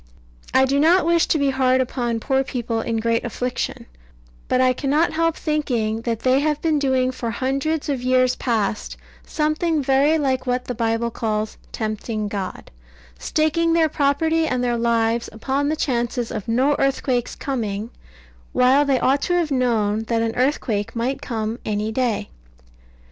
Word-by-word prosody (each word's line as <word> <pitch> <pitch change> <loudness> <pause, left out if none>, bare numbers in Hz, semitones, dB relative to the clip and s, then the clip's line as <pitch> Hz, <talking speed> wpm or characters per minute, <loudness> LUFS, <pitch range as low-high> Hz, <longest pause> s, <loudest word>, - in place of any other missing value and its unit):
I 265 - +4
do 275 +2 +1
not 335 +4 +4
wish 335 0 +3
to - - +2
be 280 -2 +2
hard 260 -1 +2
upon 240 -2 -1
poor 265 +3 +1
people 235 -4 -3
in 230 0 -2
great 230 +1 0
affliction: 245 +2 -3 0.6
but 255 - +1
I 255 0 +4
cannot 295 +5 +1
help 330 0 +1
thinking 240 -8 -1
that 230 -1 -2
they 260 +1 +3
have 300 0 0
been 315 -2 +1
doing 260 -2 +1
for 240 -2 -4
hundreds 275 +6 -1
of 275 -4 -1
years 255 0 +2
past 220 -4 -2 0.3
something 310 0 0
very 275 +4 +3
like 265 -3 -1
what 250 0 0
the 250 - -3
Bible 230 0 -1
calls 215 -1 -2 0.2
"tempting 215 -1 -3
God" 195 -2 -5 0.5
staking 320 - +1
their 325 -1 +3
property 320 +3 +1
and 250 -4 -1
their 240 -1 +1
lives 230 0 +1
upon 270 +6 -1
the 310 - 0
chances 240 -4 -1
of 210 -3 -5
no 260 +6 +2
earthquakes 260 -3 0
coming, 225 -4 -3 0.6
while 255 +3 +4
they 275 -3 +1
ought 275 +3 +2
to 355 - 0
have 335 -4 0
known 225 -5 +1
that 230 -1 +1
an 225 -1 -1
earthquake 245 -6 -1
might 245 +4 -2
come 225 -1 -3
any 210 +1 -2
day. 235 - -1
255 Hz, 165 wpm, -22 LUFS, 230-285 Hz, 0.6 s, I